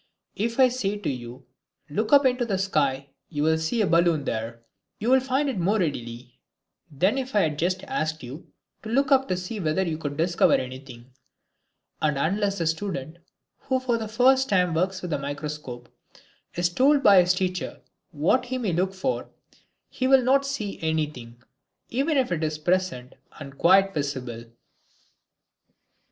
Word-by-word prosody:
If 230 Hz, +4 st, -2 dB
I 260 Hz, -, +7 dB
say 225 Hz, -5 st, -2 dB
to 205 Hz, -, -3 dB
you, 125 Hz, 0 st, -8 dB, 0.4 s
"Look 215 Hz, +9 st, -2 dB
up 285 Hz, -1 st, +6 dB
into 250 Hz, -1 st, +2 dB
the 205 Hz, -5 st, -1 dB
sky, 140 Hz, -8 st, 0 dB, 0.2 s
you 150 Hz, -3 st, -2 dB
can 160 Hz, +1 st, +2 dB
see 160 Hz, +9 st, -1 dB
a -, -, +2 dB
balloon 170 Hz, -3 st, +2 dB
there," 115 Hz, 0 st, -4 dB, 0.3 s
you 230 Hz, +4 st, -1 dB
will 265 Hz, -, +6 dB
find 265 Hz, +2 st, 0 dB
it 255 Hz, -8 st, -2 dB
more 195 Hz, +5 st, +1 dB
readily 125 Hz, -, -4 dB, 0.5 s
than 185 Hz, -, +1 dB
if 260 Hz, -3 st, -5 dB
I 205 Hz, -, +5 dB
had 150 Hz, -3 st, -1 dB
just 185 Hz, +2 st, -1 dB
asked 160 Hz, -, -3 dB
you 135 Hz, +7 st, -9 dB, 0.3 s
to 220 Hz, -, -8 dB
look 270 Hz, +4 st, +1 dB
up 270 Hz, 0 st, +4 dB
to 185 Hz, -, -1 dB
see 185 Hz, +4 st, -5 dB
whether 165 Hz, +1 st, 0 dB
you 160 Hz, -3 st, -3 dB
could 145 Hz, -2 st, -5 dB
discover 170 Hz, +2 st, +3 dB
anything. 130 Hz, -1 st, -7 dB, 0.9 s
And 150 Hz, -2 st, +1 dB
unless 200 Hz, +7 st, 0 dB
the 165 Hz, -, -1 dB
student 160 Hz, -2 st, -3 dB, 0.4 s
who 260 Hz, -1 st, -1 dB
for 245 Hz, -3 st, -1 dB
the 220 Hz, -, -4 dB
first 260 Hz, +4 st, +3 dB
time 180 Hz, -3 st, +2 dB
works 185 Hz, +3 st, -1 dB
with 175 Hz, -3 st, -3 dB
a -, -, -1 dB
microscope 145 Hz, -3 st, -6 dB, 0.7 s
is 175 Hz, 0 st, +1 dB
told 275 Hz, +9 st, +3 dB
by 195 Hz, -2 st, +8 dB
his 180 Hz, +1 st, +2 dB
teacher 185 Hz, 0 st, -3 dB, 0.3 s
what 175 Hz, -, +1 dB
he 255 Hz, +1 st, -3 dB
may 220 Hz, -8 st, -1 dB
look 185 Hz, +3 st, 0 dB
for, 225 Hz, +8 st, -2 dB, 0.6 s
he 255 Hz, -, -2 dB
will 265 Hz, -1 st, +5 dB
not 275 Hz, +2 st, +3 dB
see 215 Hz, -8 st, -4 dB
anything, 150 Hz, -7 st, -3 dB, 0.5 s
even 280 Hz, +5 st, 0 dB
if 255 Hz, -7 st, +1 dB
it 165 Hz, -2 st, -1 dB
is 155 Hz, -1 st, -1 dB
present 170 Hz, -6 st, -1 dB, 0.3 s
and 140 Hz, -2 st, -9 dB
quite 195 Hz, +5 st, +4 dB
visible. 130 Hz, -6 st, -4 dB
180 Hz, 170 wpm, -25 LUFS, 150-230 Hz, 0.9 s, by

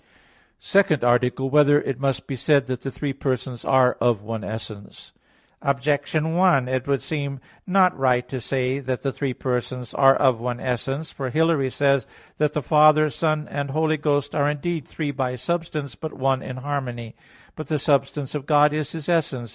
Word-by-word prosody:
_______________________ -, -, -37 dB, 0.5 s
SECOND 195 Hz, -9 st, +2 dB
ARTICLE 125 Hz, +2 st, +2 dB
[I, -, -, -1 dB
Q. -, -, -12 dB
39, 150 Hz, -, +5 dB
Art. 145 Hz, -, +6 dB
2] -, -, +4 dB
Whether -, -, -2 dB
It 130 Hz, -, -7 dB
Must 135 Hz, -1 st, -1 dB
Be 135 Hz, -, -4 dB
Said 140 Hz, +2 st, +2 dB
That 130 Hz, -2 st, -4 dB
the 135 Hz, -, -4 dB
Three 140 Hz, +1 st, -4 dB
Persons 130 Hz, -2 st, -3 dB
Are 130 Hz, -1 st, +4 dB
of 115 Hz, -4 st, +2 dB
One 110 Hz, -1 st, -5 dB
Essence? 110 Hz, -2 st, -8 dB, 0.5 s
Objection 145 Hz, +3 st, 0 dB
1: 175 Hz, -8 st, +3 dB
It 130 Hz, +1 st, -2 dB
would 140 Hz, -4 st, 0 dB
seem 140 Hz, -3 st, -4 dB, 0.3 s
not 185 Hz, -1 st, +4 dB
right 125 Hz, -2 st, +1 dB
to 130 Hz, -1 st, -5 dB
say 130 Hz, +2 st, -1 dB
that 130 Hz, -2 st, -4 dB
the 135 Hz, -, 0 dB
three 130 Hz, -2 st, -3 dB
persons 125 Hz, -1 st, -3 dB
are 135 Hz, -1 st, +5 dB
of 130 Hz, -5 st, +2 dB
one 120 Hz, 0 st, -3 dB
essence. 135 Hz, +5 st, -3 dB
For 135 Hz, -2 st, -4 dB
Hilary 155 Hz, -2 st, +2 dB
says 140 Hz, -2 st, +1 dB
(De -, -, -30 dB
Synod.) -, -, -25 dB
that 150 Hz, -1 st, +1 dB
the 150 Hz, -, -2 dB
Father, 155 Hz, +2 st, +5 dB
Son 155 Hz, -1 st, -1 dB
and 140 Hz, -1 st, -4 dB
Holy 155 Hz, +2 st, +1 dB
Ghost 145 Hz, -1 st, 0 dB
"are 145 Hz, -1 st, +2 dB
indeed 150 Hz, 0 st, -3 dB
three 150 Hz, -3 st, -3 dB
by 130 Hz, -2 st, -2 dB
substance, 150 Hz, 0 st, -3 dB
but 160 Hz, +4 st, -7 dB
one 135 Hz, 0 st, 0 dB
in 130 Hz, -, -7 dB
harmony." 130 Hz, -4 st, -5 dB, 0.4 s
But 155 Hz, -, -7 dB
the 155 Hz, -, 0 dB
substance 140 Hz, -1 st, 0 dB
of 145 Hz, -2 st, -5 dB
God 150 Hz, -1 st, +4 dB
is 155 Hz, -2 st, -3 dB
His 160 Hz, -3 st, -6 dB
essence. 145 Hz, -9 st, 0 dB
140 Hz, 205 wpm, -23 LUFS, 125-150 Hz, 0.5 s, Art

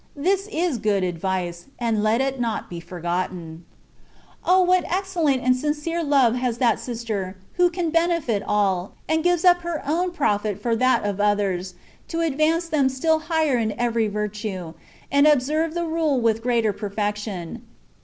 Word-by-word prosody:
This 380 Hz, +7 st, 0 dB
is 335 Hz, -, 0 dB
good 205 Hz, -2 st, +1 dB
advice, 175 Hz, 0 st, -3 dB
and 230 Hz, -3 st, 0 dB
let 220 Hz, +4 st, +2 dB
it 270 Hz, -1 st, -1 dB
not 230 Hz, -5 st, -2 dB
be 170 Hz, -, -5 dB
forgotten. 175 Hz, -1 st, -4 dB, 0.8 s
O! 370 Hz, +1 st, +4 dB
what 365 Hz, 0 st, +3 dB
excellent 345 Hz, -8 st, 0 dB
and 255 Hz, 0 st, +4 dB
sincere 300 Hz, +5 st, -2 dB
love 275 Hz, -6 st, +4 dB
has 245 Hz, -2 st, -1 dB
that 235 Hz, -3 st, +2 dB
sister, 220 Hz, -6 st, -4 dB, 0.2 s
who 355 Hz, 0 st, +3 dB
can 340 Hz, -2 st, -2 dB
benefit 330 Hz, -, +1 dB
all, 200 Hz, -3 st, 0 dB
and 320 Hz, 0 st, +1 dB
gives 355 Hz, 0 st, +2 dB
up 355 Hz, -1 st, +6 dB
her 340 Hz, -2 st, -4 dB
own 345 Hz, +5 st, +1 dB
profit 210 Hz, -, 0 dB
for 235 Hz, -2 st, 0 dB
that 255 Hz, -1 st, +2 dB
of 205 Hz, -1 st, -2 dB
others, 195 Hz, -3 st, 0 dB, 0.3 s
to 335 Hz, 0 st, -2 dB
advance 325 Hz, +2 st, +1 dB
them 285 Hz, -5 st, +2 dB
still 315 Hz, +5 st, +1 dB
higher 315 Hz, -5 st, +1 dB
in 220 Hz, -2 st, -1 dB
every 230 Hz, -2 st, +1 dB
virtue, 210 Hz, -4 st, -4 dB, 0.4 s
and 280 Hz, +1 st, +5 dB
observe 305 Hz, +3 st, +2 dB
the 345 Hz, 0 st, -1 dB
rule 320 Hz, -4 st, +1 dB
with 225 Hz, -1 st, +1 dB
greater 230 Hz, -3 st, +1 dB
perfection. 205 Hz, -1 st, -4 dB
245 Hz, 160 wpm, -23 LUFS, 205-320 Hz, 0.8 s, up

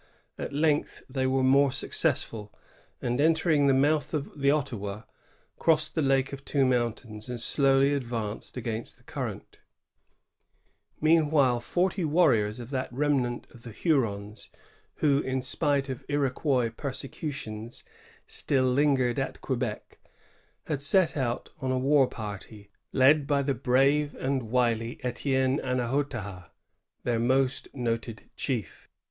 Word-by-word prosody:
At -, -, -5 dB
length 150 Hz, +1 st, 0 dB
they 130 Hz, 0 st, -1 dB
were 130 Hz, 0 st, +1 dB
more 135 Hz, +1 st, +5 dB
successful, 105 Hz, -4 st, -1 dB, 0.5 s
and 120 Hz, +3 st, 0 dB
entering 160 Hz, -2 st, +3 dB
the 135 Hz, -, +5 dB
mouth 150 Hz, +3 st, +2 dB
of 145 Hz, 0 st, -5 dB
the 140 Hz, 0 st, +3 dB
Ottawa, 115 Hz, -8 st, -1 dB, 0.6 s
crossed 155 Hz, -1 st, +2 dB
the 160 Hz, -, 0 dB
Lake 135 Hz, -1 st, +2 dB
of 135 Hz, 0 st, -7 dB
Two 140 Hz, -2 st, +1 dB
Mountains, 120 Hz, -3 st, -2 dB
and 125 Hz, -1 st, -4 dB
slowly 135 Hz, +3 st, +3 dB
advanced 115 Hz, -5 st, -4 dB
against 115 Hz, -1 st, -4 dB
the -, -, -25 dB
current -, -, -6 dB, 1.4 s
Meanwhile, 150 Hz, -5 st, +3 dB
forty 180 Hz, -, 0 dB
warriors 135 Hz, -10 st, +3 dB
of 120 Hz, +2 st, -8 dB
that 130 Hz, -3 st, -2 dB
remnant 130 Hz, -2 st, 0 dB
of 120 Hz, -, -15 dB
the 120 Hz, -, -9 dB
Hurons 110 Hz, -, -1 dB, 0.5 s
who, 140 Hz, -2 st, +2 dB
in 130 Hz, -2 st, -2 dB
spite 140 Hz, +1 st, 0 dB
of 130 Hz, -2 st, -5 dB
Iroquois 135 Hz, -3 st, +1 dB
persecutions, 130 Hz, -5 st, -5 dB, 0.4 s
still 130 Hz, -3 st, +1 dB
lingered 130 Hz, -1 st, +2 dB
at 135 Hz, -, -3 dB
Quebec, 120 Hz, -5 st, -4 dB, 0.7 s
h^ 145 Hz, -3 st, -2 dB
set 170 Hz, +5 st, +3 dB
out 125 Hz, -4 st, -2 dB
on 130 Hz, 0 st, -1 dB
a 130 Hz, -, +1 dB
war 135 Hz, +1 st, +4 dB
party, 105 Hz, -1 st, -8 dB, 0.2 s
led 140 Hz, +2 st, +4 dB
by 140 Hz, -1 st, +2 dB
the 140 Hz, 0 st, 0 dB
brave 135 Hz, +4 st, +2 dB
and 130 Hz, -4 st, -2 dB
wily 115 Hz, -1 st, 0 dB
Etienne 130 Hz, +2 st, 0 dB
Annahotaha, 120 Hz, -7 st, -2 dB, 0.5 s
their 120 Hz, -2 st, 0 dB
most 130 Hz, +2 st, +1 dB
noted 115 Hz, -3 st, -3 dB
chief. 115 Hz, -, -4 dB
130 Hz, 130 wpm, -28 LUFS, 120-145 Hz, 1.4 s, more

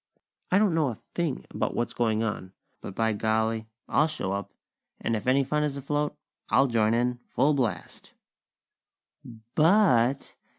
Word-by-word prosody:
I 185 Hz, -, +4 dB
don't 205 Hz, -4 st, +3 dB
know 160 Hz, -3 st, +2 dB
a 120 Hz, -, -5 dB
thing 165 Hz, -6 st, -2 dB
about -, -, -2 dB
what's 120 Hz, -, -1 dB
going 110 Hz, -2 st, +1 dB
on; 100 Hz, -4 st, -4 dB, 0.3 s
but, 95 Hz, -, -8 dB
by 110 Hz, -1 st, +1 dB
golly! 110 Hz, +1 st, 0 dB, 0.2 s
I'll 155 Hz, -, +3 dB
show 150 Hz, -11 st, -3 dB
up; 100 Hz, +1 st, -4 dB, 0.5 s
and 115 Hz, -, -1 dB
if 105 Hz, +2 st, -5 dB
any 135 Hz, +2 st, +4 dB
fun 150 Hz, +3 st, 0 dB
is 145 Hz, -2 st, -1 dB
afloat, 145 Hz, +2 st, -2 dB, 0.3 s
I'll 135 Hz, -, +4 dB
join 115 Hz, -3 st, +2 dB
in, 125 Hz, +1 st, 0 dB
full 140 Hz, +4 st, +2 dB
blast." 115 Hz, -11 st, -3 dB, 1.4 s
But!! 150 Hz, -, +3 dB
125 Hz, 155 wpm, -27 LUFS, 110-150 Hz, 1.4 s, I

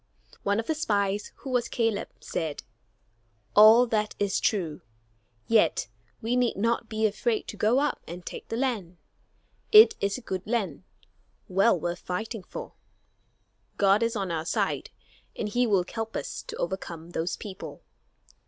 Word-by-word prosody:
One 200 Hz, +2 st, +1 dB
of 225 Hz, -, -2 dB
the 320 Hz, -, 0 dB
spies, 205 Hz, -9 st, 0 dB
who 270 Hz, -, -5 dB
was 245 Hz, -2 st, +1 dB
Caleb, 225 Hz, -4 st, 0 dB
said, 160 Hz, -4 st, -4 dB, 0.9 s
"All 220 Hz, +4 st, +9 dB
that 215 Hz, -3 st, -1 dB
is 200 Hz, -1 st, +1 dB
true, 170 Hz, -8 st, -1 dB, 0.6 s
yet 210 Hz, -, +3 dB, 0.3 s
we 235 Hz, +2 st, +1 dB
need 250 Hz, -4 st, +1 dB
not 230 Hz, +2 st, 0 dB
be 220 Hz, 0 st, 0 dB
afraid 220 Hz, +2 st, 0 dB
to -, -, -6 dB
go 215 Hz, +4 st, +2 dB
up 295 Hz, +1 st, 0 dB
and 175 Hz, +2 st, -8 dB
take -, -, -7 dB
the 225 Hz, -, -3 dB
land. 215 Hz, -10 st, -2 dB, 0.7 s
It 440 Hz, +1 st, +9 dB
is 200 Hz, +3 st, 0 dB
a -, -, -9 dB
good 190 Hz, 0 st, -4 dB
land, 210 Hz, -10 st, -2 dB, 0.6 s
well 195 Hz, +1 st, +3 dB
worth 175 Hz, +2 st, -3 dB
fighting 215 Hz, +4 st, -4 dB
for; -, -, -8 dB, 1.0 s
God 200 Hz, +1 st, +4 dB
is 230 Hz, 0 st, +1 dB
on 195 Hz, -4 st, -2 dB
our 160 Hz, -1 st, -2 dB
side, -, -, -1 dB, 0.5 s
and 215 Hz, -, -3 dB
he 245 Hz, +4 st, +1 dB
will 195 Hz, -4 st, +3 dB
help 225 Hz, -1 st, -4 dB
us -, -, -4 dB
to -, -, -6 dB
overcome 170 Hz, -2 st, -4 dB
those 170 Hz, +1 st, -2 dB
people." 190 Hz, -3 st, -8 dB
210 Hz, 155 wpm, -27 LUFS, 185-230 Hz, 1.0 s, All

